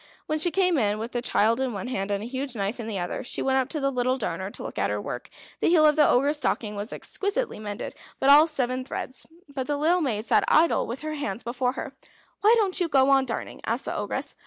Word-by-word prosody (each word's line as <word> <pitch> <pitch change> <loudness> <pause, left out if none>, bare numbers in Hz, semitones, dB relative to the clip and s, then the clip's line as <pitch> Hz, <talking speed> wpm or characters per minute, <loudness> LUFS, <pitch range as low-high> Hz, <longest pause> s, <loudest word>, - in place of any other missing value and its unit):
When 310 0 -1
she 350 - +3
came 360 -3 +2
in, 210 -2 +1
with 225 +3 -5
the 240 - -2
child 230 0 +2
in 260 -3 -1
one 200 +1 -5
hand, 205 -6 -3
and 200 0 -1
the - - -5
huge 260 0 -4
knife 205 +3 -2
in 225 - -5
the 215 -3 -3
other, 175 -1 -3
she - - -2
went 265 0 +2
up 260 - -1
to 310 - -2
the 275 -1 0
little 255 0 0
darner 190 -5 -3
to - - -8
look - - -6
at 100 - +1
her 105 0 -1
work. 125 +4 -6 0.3
The - - +2
heel 325 -3 +5
of 300 -1 +5
the 300 -2 +5
Ogre's 285 +4 +3
stocking 225 -6 -1
was 205 +2 -4
exquisitely 405 - -2
mended, 205 -1 -5 0.3
all - - -2 0.2
but 325 - +2
seven 255 -3 -1
threads; 260 0 -5 0.2
but 275 -3 -5
the 290 - 0
little 335 +5 +2
maid 225 -7 -1
sat - - +3
idle 330 +2 +3
with 235 +3 -5
her 310 0 -4
hands 245 -8 -4
before 250 +1 -1
her. - - -6 0.5
"Why 435 +3 +5
don't 390 -4 +1
you 350 - +1
go 275 -3 +4
on 270 -1 +4
darning?" 230 - -5
asked - - -2
the - - -3
Ogress. - - -3
260 Hz, 255 wpm, -26 LUFS, 220-300 Hz, 0.5 s, heel